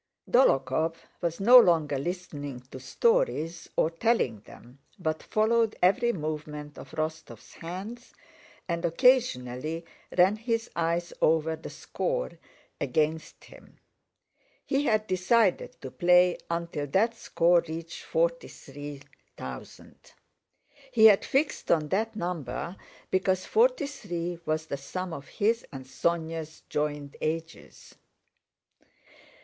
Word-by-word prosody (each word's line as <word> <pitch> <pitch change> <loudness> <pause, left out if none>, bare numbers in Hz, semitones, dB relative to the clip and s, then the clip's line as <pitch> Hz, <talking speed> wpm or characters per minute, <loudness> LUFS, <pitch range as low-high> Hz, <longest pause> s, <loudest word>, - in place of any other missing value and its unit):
Dólokhov 160 - +3 0.3
was 170 -2 -2
no 245 +6 +9
longer 160 - +3
listening 145 -5 -5
to 130 - -8
stories 175 - 0
or 160 - +2
telling 165 - +1
them, 120 +5 -16 0.2
but 160 -4 -2
followed 220 +1 +2
every 200 +6 +3
movement 150 -4 -5
of - - -10
Rostóv's 160 0 -5
hands 200 +9 -8 0.6
and 170 -1 -2
occasionally 165 - +2 0.3
ran 190 +4 +5
his 230 0 -2
eyes 170 +1 -1
over 160 0 +3
the 160 - -9
score - - -3 0.5
against 155 0 -1
him. - - -16 0.9
He 275 +2 0
had 215 -4 +2
decided 185 +2 +1
to 130 - -7
play 180 0 +4
until 170 -3 -3
that 215 - +2
score 170 -5 +3
reached 165 +1 -6
forty 170 +1 0
three 145 0 -9 0.3
thousand. - - -10 0.8
He 225 -3 +5
had 210 -3 +7
fixed 275 +2 0
on 155 -3 +2
that 220 +5 0
number 175 - -4 0.4
because 185 0 +1
forty - - +3
three 175 - -5
was 155 0 0
the 140 - -4
sum 185 +6 -5
of 140 -3 -8
his 230 +3 0
and 135 -2 -8
Sónya's 160 +2 -2
joint 150 -1 -2
ages. 160 +1 -5
170 Hz, 115 wpm, -28 LUFS, 155-215 Hz, 0.9 s, no